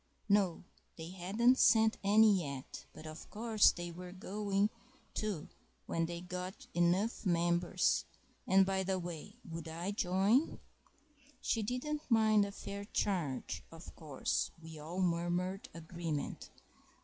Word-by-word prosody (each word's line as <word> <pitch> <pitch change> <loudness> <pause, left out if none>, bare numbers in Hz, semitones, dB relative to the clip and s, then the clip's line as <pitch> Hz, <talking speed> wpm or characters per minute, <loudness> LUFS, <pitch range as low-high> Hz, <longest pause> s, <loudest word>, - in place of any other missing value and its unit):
(No, 200 -5 +2 0.3
they 165 +1 -7
hadn't 210 +8 +2
sent 220 0 +5
any 205 -1 +6
yet; 140 -4 -7
but 155 - -12
of 155 +1 -9
course 220 -1 +4
they 175 -1 -6
were 180 +1 -8
going 200 +2 -1 0.4
to, 205 -8 -2 0.4
when 165 0 0
they 170 0 -5
got 180 +1 -6
enough 180 +6 +2
members, 175 -1 +2 0.4
and, 190 0 +6
by 190 0 0
the 190 0 0
way, 175 -3 -6
would 165 0 -6
I 170 +4 -3
join?) 200 - +2 0.8
She 225 - 0
didn't 260 +8 -3
mind 220 -3 +5
a 200 - -5
fair 200 0 -6
charge, 175 -11 -2
of 165 0 -11
course 150 -5 -1
(we 160 -1 -10
all 170 +5 -4
murmured 175 +2 0
agreement). 165 -2 -5
185 Hz, 130 wpm, -34 LUFS, 170-205 Hz, 0.8 s, any